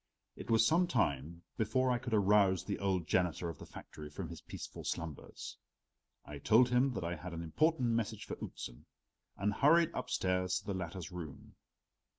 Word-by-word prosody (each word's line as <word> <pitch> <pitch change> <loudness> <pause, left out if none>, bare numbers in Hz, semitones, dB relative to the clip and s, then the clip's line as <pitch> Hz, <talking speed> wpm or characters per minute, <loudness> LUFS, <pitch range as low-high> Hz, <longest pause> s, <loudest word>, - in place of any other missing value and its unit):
It - - -9
was 115 -1 +5
some 175 +7 +4
time 85 - 0
before 125 +4 +2
I 120 - +1
could 120 -3 -1
arouse 100 -3 +4
the 100 - -3
old 95 -4 0
janitor 85 0 +1
of 80 - -8
the - - -10
factory 75 -1 -10
from 80 +2 -6
his 85 - -8
peaceful - - -8
slumbers. 80 -3 -5 0.7
I 75 0 -8
told 120 - +5
him 125 +2 +3
that 95 - -3
I 85 +1 -2
had 90 +2 -7
an 85 - -4
important 130 - +2
message 110 -2 -1
for - - -5
Outzen, - - -7 0.5
and 105 +2 +1
hurried 165 +7 +5
upstairs 90 -6 0
to 105 - -7
the 100 - -2
latter's 90 -2 -5
room. 85 -5 -8
95 Hz, 175 wpm, -34 LUFS, 85-120 Hz, 0.7 s, was